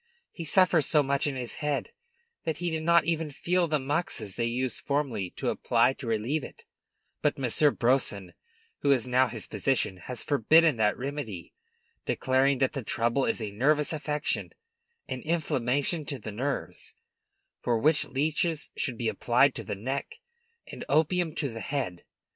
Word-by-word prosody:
He 165 - -7
suffers 175 -3 +4
so 150 -2 +4
much 140 +1 +1
in 140 - -2
his 125 -2 -4
head 150 -2 -1 0.5
that 160 -2 -2
he 175 -1 -2
did 160 0 -2
not 170 +1 +4
even 165 -2 0
feel 175 +5 0
the 155 -1 +1
moxas 135 - -2
they 115 -1 0
used 125 0 -2
formerly 135 -10 -1
to - - -1
apply 120 +2 +2
to 135 -2 -9
relieve 115 +7 0
it; - - -11 0.6
but - - +1
Monsieur 135 +3 +3
Brousson, 115 -9 0 0.5
who 145 - 0
is 130 -4 +3
now 130 +1 +3
his - - -4
physician, 95 - 0
has 120 +7 -6
forbidden 150 +2 +4
that 105 -1 +2
remedy, 125 - -5 0.5
declaring 130 +1 +2
that 135 0 +1
the 135 - -3
trouble 120 +3 0
is 115 - -1
a 105 - -4
nervous 145 +9 +2
affection, 150 +2 -2 0.5
an 130 - -4
inflammation 150 -1 0
of 130 -6 -6
the 110 - -5
nerves, 135 +6 -4 0.7
for 120 -1 +1
which 150 +7 +3
leeches 155 +3 -1
should 125 -4 -2
be 115 - -2
applied 125 +5 +3
to 115 - -6
the 105 0 -4
neck, 135 - -4 0.6
and - - -7
opium 160 +2 +2
to 145 - -1
the 115 -1 -7
head. 125 -12 -3
135 Hz, 165 wpm, -28 LUFS, 120-150 Hz, 0.7 s, suffers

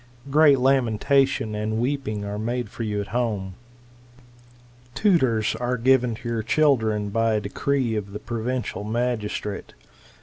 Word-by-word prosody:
Great 145 -1 +6
lamentation 130 -1 +2
and 105 +1 -2
weeping 120 -5 -2
are 100 +1 -4
made 120 +3 -2
foryqju' 105 -3 -3
at 100 - -6
home.' 105 -6 -2 1.4
Tutors 130 - +2
are 125 +1 -1
given 125 -1 +3
to 120 +2 -9
your 115 -1 -1
children 110 -5 +2
by 115 +2 +1
a - - +2
decree 120 +3 -1
of 100 -2 -4
the 105 - -5
provincial 120 -2 -3
magistrate. 110 -2 -3
115 Hz, 130 wpm, -24 LUFS, 105-130 Hz, 1.4 s, Great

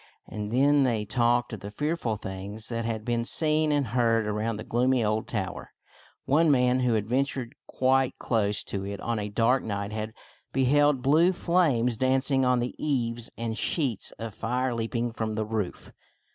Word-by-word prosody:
And 105 -1 -5
then 140 +4 +4
they 115 -5 0
talked 120 +2 +1
of 110 - -5
the 100 - -7
fearful 145 0 -2
things 100 +2 -6
that 115 -1 -3
had 110 -2 -3
been 120 -1 0
seen 155 +4 +2
and 145 -5 +1
heard 115 -2 +2
around 105 +1 -2
the 110 - -6
gloomy 125 +1 +1
old 110 +1 -1
tower. 100 -5 -4 0.6
One 155 +4 +3
man 125 -2 +3
who 125 -2 +2
had 105 -2 0
ven 130 +4 +2
tured 130 -3 -5 0.2
quite 130 0 +1
close 105 -3 0
to 100 -1 -4
it 100 0 -5
on 115 -2 -2
a 105 0 -3
dark 115 +5 +2
night 100 -1 -4
had 110 0 -4 0.4
behejid 135 0 +3
blue 160 +6 +4
flames 145 -11 +2
dancing 130 +2 +2
on 125 0 +3
the 120 - -3
eaves 120 -5 0
and 115 -1 -3
sheets 130 - -1
of 115 -2 -6
fire 125 +4 -1
leaping 115 +1 -2
from 110 -2 -3
the 110 0 -1
roof. 105 -3 -4
120 Hz, 180 wpm, -27 LUFS, 110-130 Hz, 0.6 s, then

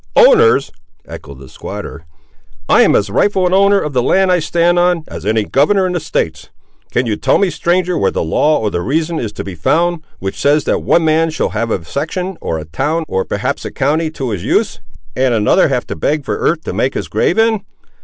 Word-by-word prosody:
"Owners!" 455 -3 +5 0.3
echoed 70 -2 -10
the 65 0 -13
squatter, 80 +4 -8 0.6
"I - - +5
am - - +4
as 100 -1 0
rightful 190 - +1
an 180 - +1
owner 200 +1 +4
of 150 -5 -4
the 125 - +2
land 190 +8 +2
I 180 - +3
stand 170 +2 +1
on, 175 -2 +1
as - - -7
any 110 0 +1
governor 185 - +2
in 180 - -2
the 175 - -1
States! 80 - -3 0.4
Can 125 - 0
you 110 -3 -1
tell - - +1
me, 195 -3 +1
stranger, 180 +1 0
where 95 - +2
the - - -2
law 150 - +2
or 105 -2 -2
the 85 - -2
reason, 160 - -1
is 110 -4 -4
to - - -6
be 100 - -7
found, 165 - 0 0.2
which 95 0 -5
says 145 +1 +3
that - - 0
one 165 -1 +2
man 160 +1 +2
shall 155 - -2
have 115 - -2
a 90 -6 -3
section, 180 - -4
or 80 - -3
a 80 - -7
town, 150 - -2
or 95 -7 -1
perhaps - - -3
a - - -5
county 155 +4 0
to 135 -6 -5
his 95 -5 -4
use, - - 0 0.4
and 130 -2 +1
another 105 -2 +3
have - - -1
to - - -6
beg 145 - -1
for - - -2
earth 160 -1 0
to - - -5
make 135 - -1
his - - -3
grave 175 - 0
in? 225 -2 +2
155 Hz, 225 wpm, -15 LUFS, 110-180 Hz, 0.6 s, Owners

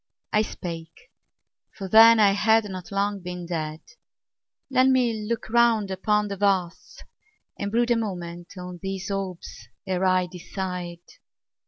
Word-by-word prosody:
I 210 - +4
spake 170 - -7 0.6
for 195 - -6
then 225 +3 +8
I 205 -2 +6
had 220 +2 +3
not 185 -1 -8
long 200 +1 -1
been 180 -1 -7
dead 155 -2 -4 0.9
"Let 260 0 +4
me 235 -5 +1
look 235 -1 -2
round 230 -4 +3
upon 210 +2 +1
the 200 -1 -5
vasts, 190 -3 -1 0.6
and 200 0 -3
brood 240 +2 +1
A - - +5
moment 175 -4 -6
on 180 -1 -8
these 195 0 -4
orbs 195 -3 -6 0.2
ere 185 0 -1
I 185 -1 +3
decide 180 -1 -6
195 Hz, 140 wpm, -25 LUFS, 180-215 Hz, 0.9 s, then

